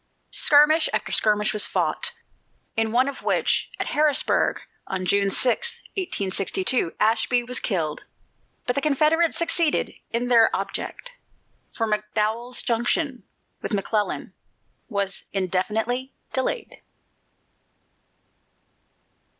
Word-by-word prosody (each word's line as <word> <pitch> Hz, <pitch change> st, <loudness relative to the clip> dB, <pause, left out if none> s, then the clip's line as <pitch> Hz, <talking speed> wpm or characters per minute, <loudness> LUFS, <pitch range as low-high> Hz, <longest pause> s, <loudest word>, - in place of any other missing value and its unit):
Skirmish 305 Hz, +1 st, +6 dB
after -, -, -2 dB
skirmish 210 Hz, -1 st, +2 dB
was 210 Hz, -, +2 dB
fought, -, -, -1 dB, 0.6 s
in 225 Hz, 0 st, +1 dB
one 250 Hz, +3 st, +3 dB
of 280 Hz, -, -5 dB
which, -, -, +1 dB
at -, -, -1 dB
Harrisonburg, 300 Hz, -1 st, +2 dB, 0.3 s
on 185 Hz, -1 st, -3 dB
June 200 Hz, +1 st, +2 dB
6, 260 Hz, -, +2 dB, 0.2 s
1862, 195 Hz, -, 0 dB
Ashby 230 Hz, +3 st, +2 dB
was 250 Hz, +1 st, -1 dB
killed. 165 Hz, -8 st, -2 dB, 0.6 s
But 245 Hz, -, 0 dB
the 280 Hz, -, -1 dB
Confederates 310 Hz, +3 st, +2 dB
succeeded 335 Hz, -1 st, +1 dB, 0.2 s
in 235 Hz, +1 st, -2 dB
their 230 Hz, -2 st, +5 dB
object, -, -, -5 dB, 0.6 s
for 225 Hz, -, -2 dB
McDowell's 215 Hz, +3 st, -2 dB
junction 245 Hz, +3 st, -1 dB, 0.4 s
with -, -, -4 dB
McClellan 205 Hz, +1 st, -2 dB, 0.6 s
was 200 Hz, -3 st, -2 dB
indefinitely 215 Hz, +7 st, -1 dB, 0.2 s
delayed. 430 Hz, -, -2 dB
235 Hz, 100 wpm, -24 LUFS, 210-280 Hz, 0.6 s, Skirmish